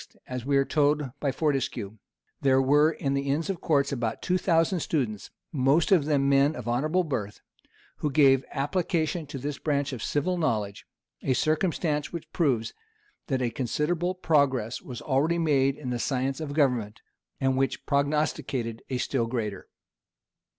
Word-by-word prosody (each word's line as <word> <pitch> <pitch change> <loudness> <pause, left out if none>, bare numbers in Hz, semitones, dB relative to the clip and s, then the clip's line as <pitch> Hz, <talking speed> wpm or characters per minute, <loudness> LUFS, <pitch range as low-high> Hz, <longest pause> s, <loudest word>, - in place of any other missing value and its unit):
as 125 -1 -5
we 140 +2 +2
are 135 - +3
told 145 -2 +1
by 140 - 0
Fortescue, 130 -8 -2 0.4
there 135 -1 +4
were 145 +4 +4
in 135 -4 -2
the 140 0 -1
inns 160 +7 0
of 180 - -7
court 145 -4 +2
about 120 -4 -2
two 185 0 +1
thousand 170 0 +2
students, 120 - -2 0.2
most 145 +4 +2
of 170 -7 +5
them 145 -2 +2
men 140 +2 +4
of 120 -2 -7
honorable 155 +10 +1
birth, 105 - -4 0.6
who 150 - -1
gave 135 -2 +5
application 160 +1 -1
to 140 - -6
this 140 +2 -4
branch 145 -2 -1
of 120 - -5
civil 175 +8 -1
knowledge: 105 -10 -1 0.3
a 130 - +1
circumstance 155 -2 0
which 170 -2 -8
proves, 130 -9 +1 0.5
that 130 -3 0
a 120 - 0
considerable 165 +9 -1
progress 140 -9 +1
was 125 -2 -8
already 150 +4 +1
made 140 -5 +2
in 130 -4 -5
the 120 - -2
science 135 +2 -1
of 150 -3 -4
government, 125 -8 0 0.4
and 135 0 +1
which 135 0 -1
prognosticated 140 -5 -1
a 130 - -1
still 125 -2 -1
greater. 110 -4 -4
140 Hz, 160 wpm, -27 LUFS, 130-155 Hz, 0.6 s, of